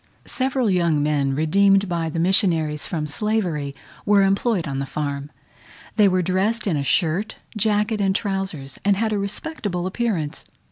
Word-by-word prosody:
Several 260 -2 0
young 170 -6 +2
men, 140 -2 +1
redeemed 195 +6 +3
by 170 -2 -1
the 160 - -5
missionaries 165 -5 +2
from 155 -3 -2
slavery, 160 -5 -1 0.3
were 205 -1 +4
employed 195 -1 +1
on 135 -1 -3
the 140 - -3
farm. 140 -1 -4 0.7
They 210 -3 +5
were 185 -1 +2
dressed 195 +6 0
in 190 -6 +1
a 145 - 0
shirt, 165 - 0 0.2
jacket, 210 0 +1
and 195 -1 +1
trousers, 190 - -3
and 200 -1 +3
had 220 +1 0
a 205 - 0
respectable 200 - -3
appearance. 190 -7 -2
185 Hz, 155 wpm, -22 LUFS, 150-210 Hz, 0.7 s, They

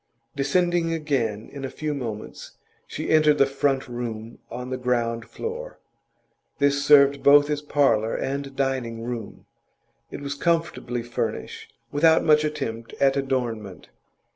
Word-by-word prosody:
Descending 170 +4 +1
again 130 -9 -1
in 140 -1 -7
a 135 - -3
few 150 +2 -3
moments, 115 -7 -6 0.3
she - - -4
entered 155 -1 +5
the 140 - +5
front 135 0 0
room 120 -2 -6
on 125 +2 -6
the 130 - -2
ground 120 -2 -1
floor. 485 +2 -6 0.8
This 140 -1 +2
served 140 -1 +6
both 145 +1 +6
as 145 0 -1
parlour 135 -7 +2
and 140 0 -3
dining 130 -4 -2
room; 115 -3 -6 0.6
it - - -7
was 140 0 -3
comfortably 145 -7 -1
furnished, 120 0 -5 0.2
without 160 +2 +4
much 150 -1 +5
attempt 115 -7 -4
at 135 0 +2
adornment. 120 -9 -3
135 Hz, 135 wpm, -24 LUFS, 120-150 Hz, 0.8 s, served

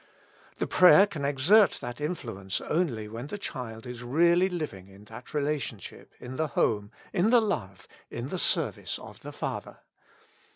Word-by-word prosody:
The - - -1
prayer 185 +2 +7
can 170 -9 -7
exert 160 +10 +5
that 120 +3 -7
influence 115 - -3
only 140 -11 -1
when 115 +5 -7
the 205 - -5
child 120 - -6
is 125 -1 -7
really 170 +8 +3
living 150 - -5
in 100 +1 -16
that 115 +3 -11
relationship 145 -8 -4
in 125 +1 -8
the 160 - 0
home, 105 -7 0 0.2
in 190 +4 +2
the 245 0 +6
love, 100 - -3 0.2
in - - -5
the - - -3
service - - +1
of - - -12
the - - -8
Father. - - -5
135 Hz, 160 wpm, -28 LUFS, 110-175 Hz, 0.2 s, prayer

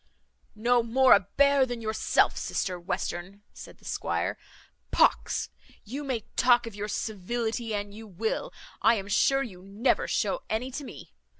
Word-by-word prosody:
"No 240 +3 +3
more 255 +3 +5
a - - +7 0.2
bear 280 -1 +5
than 245 -2 -3
yourself, 220 -1 +2
sister 180 -2 -2
Western," 175 +3 -4
said - - -11
the - - -21
squire. - - -1 0.5
"Pox! - - +2 0.3
you 270 +8 -6
may 260 -5 -2
talk 245 -1 +4
of 230 - -7
your 205 +1 -4
civility 220 +2 -3
an 205 0 -4
you 220 +2 -10
will, 220 - -3 0.3
I 230 - +5
am 200 -2 -4
sure 270 +7 +3
you 190 -8 -9
never 200 +6 0
shew - - 0
any 240 +4 -2
to 285 +3 -5
me. - - -11
225 Hz, 160 wpm, -28 LUFS, 205-250 Hz, 0.5 s, a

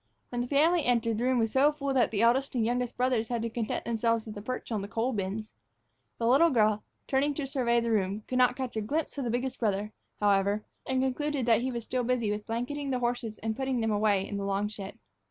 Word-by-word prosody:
When 245 -1 -2
the 245 - -2
family 315 +5 +3
entered, 230 -3 +1
the 240 - 0
room 255 0 +2
was 225 -2 +1
so 275 +4 +4
full 280 -2 -2
that 255 -3 +3
the 215 0 0
eldest 260 +4 +2
and 235 - +2
the - - +1
youngest 245 +1 -1
brothers 250 -3 +1
had 235 -1 -2
to 230 - -2
content 230 -2 -3
themselves 230 -1 0
with 215 -1 -8
a 205 - -6
perch 250 +3 -5
on 215 -3 -1
the 200 - -5
coal 230 +4 -1
bins. 210 +1 -3 0.7
The 230 - -2
little 275 +8 +5
girl, 215 -5 +2 0.2
turning 280 +2 +1
to 290 - -2
survey 250 -3 +1
the 230 0 -1
room, 205 0 0
could 255 - 0
not 250 0 +4
catch 260 -3 -4
a 220 - 0
glimpse 295 +6 -2
of 270 - -2
the - - -1
biggest 245 +3 -2
brother, 210 -2 0 0.3
however, 205 0 +2 0.2
and 260 0 +1
finally 265 - +2
concluded 295 -2 -2
that 235 -1 +4
he 260 - -1
was 235 -2 -4
still 250 +2 -1
busy 235 -3 0
with 210 0 -4
blanketing 255 +5 -3
the 260 - +1
horses 240 -2 -2
and 220 -1 -1
putting 265 -1 -1
them 225 -1 0
away 205 -2 +2
in 205 - -4
the 200 - -3
long 200 +1 0
shed. 200 -2 -8
235 Hz, 255 wpm, -29 LUFS, 215-260 Hz, 0.7 s, little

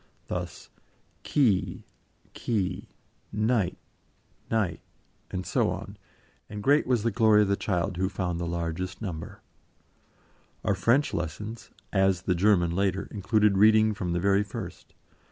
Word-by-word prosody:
Thus: - - -5 0.5
"key, 115 -10 +1 0.5
quay," 95 -6 -2 0.4
"knight, 110 -3 +1 0.7
night," 105 -8 0 0.5
and 90 -1 -4
so - - +1
on, - - -5 0.5
and 105 0 -6
great 145 +1 +4
was 125 -4 +2
the 115 - +1
glory 105 -1 +5
of - - 0
the 100 - +3
child 95 -2 -1
who 95 +1 0
found 90 -3 -2
the 85 - -2
largest 85 +2 -3
number. 90 -7 -6 1.2
Our - - +3
French 115 +9 +2
lessons 105 +7 -5 0.2
as 95 -2 +2
the 90 - +1
German 90 -2 +3
later 95 +2 0
included 105 0 +2
reading 110 +1 +6
from 90 -4 -3
the 85 - 0
very 100 +2 +3
first. 100 - -7
100 Hz, 135 wpm, -27 LUFS, 90-110 Hz, 1.2 s, reading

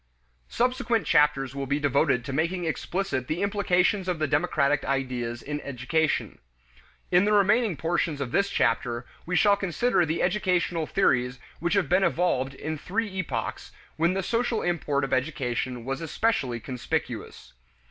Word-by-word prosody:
Subsequent 240 - 0
chapters 150 -4 +3
will 140 -1 -4
be 140 +2 0
devoted 140 -4 +2
to 135 - -4
making 170 +4 0
explicit 160 -4 -2
the 170 +5 -1
implications 200 -1 +1
of 180 -2 0
the 155 - 0
democratic 145 0 +1
ideas 125 -3 -2
in 150 +1 -4
education. 150 +4 -1 0.7
In 180 +2 +5
the 210 - +2
remaining 210 -2 +3
portions 165 -2 -1
of 135 -4 -3
this 200 0 +2
chapter, 120 0 0 0.2
we 180 - -1
shall 205 +2 +5
consider 195 +1 +1
the 160 0 -1
educational 180 -4 0
theories 125 -9 +1 0.2
which 170 +4 0
have 195 -6 +2
been 185 +4 +3
evolved 160 -7 +1
in 155 +2 -4
three 205 +3 -2
epochs 130 -10 -4 0.2
when 170 +3 +1
the 195 - -1
social 230 +2 0
import 150 -5 0
of 135 - -2
education 130 -3 -2
was 135 +2 -3
especially 155 - 0
conspicuous. 125 +1 -4
160 Hz, 150 wpm, -26 LUFS, 135-190 Hz, 0.7 s, In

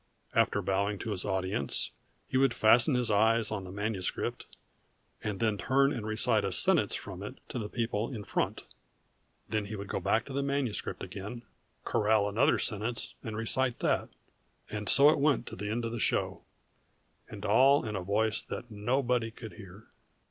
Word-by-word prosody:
After 100 - +2
bowing 100 +2 0
to 110 - -5
his 95 -3 -3
audience 95 -7 0 0.4
he - - -5
would 130 -2 +3
fasten 120 +5 +5
his 125 -3 +1
eyes 110 +2 +3
on 100 -3 -3
the 90 - -8
manuscript 100 -2 -3 0.8
and 105 -3 -3
then 110 -3 0
turn 135 +2 +3
and 115 -5 -4
recite 110 0 +2
a - - -1
sentence - - +3
from - - -7
it - - -7
to - - -3
the 105 -2 -4
people 115 +1 -2
in 110 -5 -6
front. - - -2 0.8
Then 105 -1 -1
he 110 - -5
would 100 -1 -7
go - - -1
back 110 - +1
to 135 - -8
the 140 - 0
manuscript 140 -5 -2
again, 110 +5 -7 0.4
corral 105 -1 +2
another 105 +5 +3
sentence, 115 +2 -1
and 110 -2 -5
recite 120 +3 +1
that. - - +1 0.6
_And 105 -2 -3
so 145 +2 +8
it - - 0
went 140 -4 +2
to - - -7
the 105 +2 -5
end 115 +2 -2
of 115 - -3
the 120 - -4
show - - 0 0.9
and - - -8
all 135 +1 +5
in 105 -1 -4
a 95 - -2
voice 110 +4 0
that 120 - -7
nobody 120 +2 0
could 110 -1 -10
hear! 100 -1 -12
110 Hz, 180 wpm, -30 LUFS, 105-120 Hz, 0.9 s, so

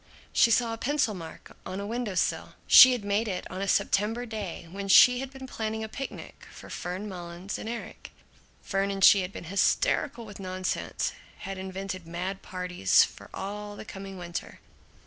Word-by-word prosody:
She 235 - +5
saw 230 0 +2
a 225 - -6
pencil 275 -4 +1
mark 165 -4 -10
on 185 +1 -5
a 200 - -4
window 225 -2 -3
sill. 180 - 0
She 255 -1 +10
had 235 -5 -4
made 205 +3 +1
it 185 -3 -3
on 185 +1 -5
a 200 - -1
September 220 +5 +1
day 205 -7 -6
when 200 +1 -5
she 250 +5 +7
had 270 0 -4
been 265 -1 -10
planning 220 -3 -4
a - - -4
picnic 270 +5 -8
for - - -12
Fern 185 +4 -4
Mullins 175 0 -6
and 220 - -5
Erik. 235 0 -7 0.5
Fern 195 0 0
and 195 -1 -2
she 200 - +8
had 180 +1 -4
been - - -8
hysterical 230 - +1
with 205 -2 -11
nonsense, 185 -1 -2 0.3
had 195 -1 -5
invented 190 -2 -6
mad 185 +3 -4
parties 180 - +2
for - - -8
all 205 +1 -6
the - - -9
coming 195 -1 -8
winter. 175 -1 -6
200 Hz, 185 wpm, -28 LUFS, 185-225 Hz, 0.5 s, She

